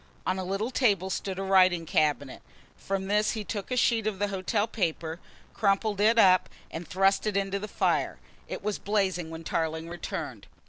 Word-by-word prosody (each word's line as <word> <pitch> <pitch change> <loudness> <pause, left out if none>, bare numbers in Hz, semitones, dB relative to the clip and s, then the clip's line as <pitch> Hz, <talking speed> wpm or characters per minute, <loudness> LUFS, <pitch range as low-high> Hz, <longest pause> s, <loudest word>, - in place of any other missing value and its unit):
On 185 +1 0
a - - -2
little 195 +6 -2
table 200 -8 +2
stood 190 0 -3
a 195 - -2
writing 185 -3 +4
cabinet. 150 -4 0 0.3
From 195 0 -3
this 210 +2 +2
he 220 -2 -4
took 205 -1 -5
a 250 - -1
sheet 230 -2 +2
of 210 -3 -1
the 205 +1 0
hotel 200 +2 0
paper, 170 -6 -2 0.3
crumpled 205 0 +1
it 225 +2 +4
up 185 -4 +5 0.2
and 165 0 -6
thrust 195 +3 +2
it 205 -2 0
into 195 0 -1
the 210 - -5
fire. - - 0 0.3
It - - -6
was 210 -1 -2
blazing 190 -5 0
when 165 0 -8
Tarling 160 0 -2
returned. 175 0 -6
195 Hz, 185 wpm, -28 LUFS, 180-210 Hz, 0.3 s, up